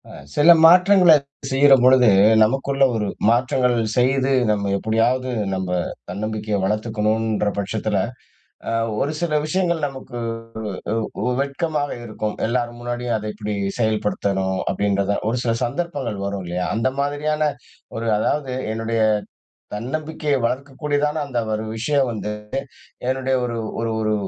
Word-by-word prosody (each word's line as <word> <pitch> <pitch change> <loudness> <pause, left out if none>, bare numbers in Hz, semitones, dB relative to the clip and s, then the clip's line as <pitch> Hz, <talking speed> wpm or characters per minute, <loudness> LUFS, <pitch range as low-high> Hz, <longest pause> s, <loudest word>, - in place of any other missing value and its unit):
அ - - -11 0.2
சில 150 +4 +7
மாற்றங்களச் 180 -4 +6 0.2
செய்யுறம்பொழுது, 130 -2 +5 0.4
நமக்குள்ள 135 +4 +1
ஒரு 105 -2 -1 0.2
மாற்றங்கள் 125 +1 +2 0.2
செய்து 130 +2 +2 0.2
நம்ம 100 -1 -1
எப்டியாவது 120 +5 +1 0.2
நம்ப 95 -1 -3 0.4
தன்னம்பிக்கைய 105 +2 -3
வளர்த்துக்கணும்ன்ற 110 +1 0
பட்சத்தில, 105 +1 -1 0.7
அ - - -1 0.3
ஒரு 145 - 0
சில 155 -3 +1
விஷயங்கள் 170 -2 0
நமக்கு 130 -3 -9 0.9
உ - - -18
உ - - +1
உ - - -1
வெட்கமாக 145 +1 -1 0.2
இருக்கும். 110 -1 -4
எல்லார் 120 0 -1
முன்னாடியும் 120 -1 -2
அத 105 0 -6
எப்டி 105 -1 -4 0.2
செயல்படுத்தணும். 100 -3 0
அப்டின்றத. 100 +1 0
ஒரு 120 - -1
சில 115 - +2
சந்தர்ப்பங்கள் 125 - -3
வரும் 100 -1 -4
இல்லயா? 90 +1 -2
அந்த 115 +3 +1
மாதிரியான 150 +2 -1 0.5
ஒரு, 115 0 -3
அதாவது 135 +4 -1 0.2
என்னுடைய 115 0 -2 0.7
தன்னம்பிக்கைய 150 +5 -2
வளர்க்கக்கூடிய 140 +4 -2
தான 150 +1 -1
அந்த 130 -3 -3
ஒரு 110 0 -2
விஷயம் 135 +3 +1
வந்து, 105 -2 -4 0.8
என்னுடைய 130 0 0
ஒரு 120 -1 -3 0.2
ஒரு 115 0 -1
ஒரு 110 0 +1
120 Hz, 125 wpm, -21 LUFS, 110-140 Hz, 0.9 s, சில